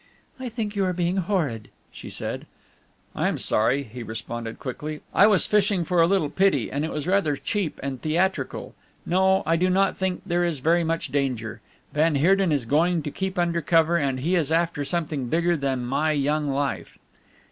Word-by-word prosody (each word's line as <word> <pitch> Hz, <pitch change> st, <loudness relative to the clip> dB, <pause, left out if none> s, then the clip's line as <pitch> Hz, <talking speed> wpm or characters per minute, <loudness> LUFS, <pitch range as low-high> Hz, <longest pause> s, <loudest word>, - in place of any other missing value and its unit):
"I 255 Hz, -1 st, -4 dB
think 220 Hz, -3 st, -4 dB
you 200 Hz, -, +1 dB
are 185 Hz, -, 0 dB
being 175 Hz, +1 st, 0 dB
horrid," 165 Hz, -, -1 dB, 0.2 s
she -, -, -10 dB
said. -, -, -5 dB, 0.7 s
"I -, -, +1 dB
am -, -, -1 dB
sorry," 125 Hz, +6 st, +1 dB
he 120 Hz, 0 st, -9 dB
responded 115 Hz, 0 st, -6 dB
quickly, 150 Hz, +4 st, -6 dB
"I 205 Hz, -, +6 dB
was 210 Hz, -3 st, +3 dB
fishing 200 Hz, -4 st, +2 dB
for 175 Hz, +1 st, +2 dB
a 165 Hz, -, +5 dB
little 180 Hz, -6 st, +1 dB
pity, 190 Hz, -, +2 dB
and 140 Hz, +2 st, -1 dB
it 160 Hz, -, -2 dB
was 150 Hz, -1 st, -3 dB
rather 180 Hz, -6 st, +2 dB
cheap 195 Hz, +3 st, -3 dB
and 135 Hz, -2 st, -4 dB
theatrical. 175 Hz, +5 st, -1 dB, 0.3 s
No, 190 Hz, +2 st, +3 dB
I 165 Hz, -, +2 dB
do 185 Hz, +2 st, +2 dB
not 195 Hz, +2 st, +2 dB
think 190 Hz, -1 st, -2 dB
there 175 Hz, -2 st, +1 dB
is 170 Hz, -3 st, 0 dB
very 165 Hz, +6 st, +2 dB
much 165 Hz, 0 st, -2 dB
danger. 125 Hz, -6 st, -2 dB, 0.3 s
Van 155 Hz, +1 st, +2 dB
Heerden 185 Hz, +5 st, +3 dB
is 140 Hz, -5 st, 0 dB
going 165 Hz, +5 st, +2 dB
to 145 Hz, -, -4 dB
keep 190 Hz, +3 st, -4 dB
under 170 Hz, -1 st, +1 dB
cover, 165 Hz, +2 st, +3 dB
and 135 Hz, -5 st, 0 dB
he 170 Hz, +7 st, 0 dB
is 160 Hz, -4 st, +1 dB
after 165 Hz, -2 st, +1 dB
something 150 Hz, -4 st, -2 dB
bigger 170 Hz, +5 st, +2 dB
than 135 Hz, -4 st, -2 dB
my 150 Hz, +5 st, +1 dB
young 150 Hz, +1 st, 0 dB
life." 135 Hz, -11 st, -2 dB
165 Hz, 190 wpm, -24 LUFS, 140-185 Hz, 0.7 s, I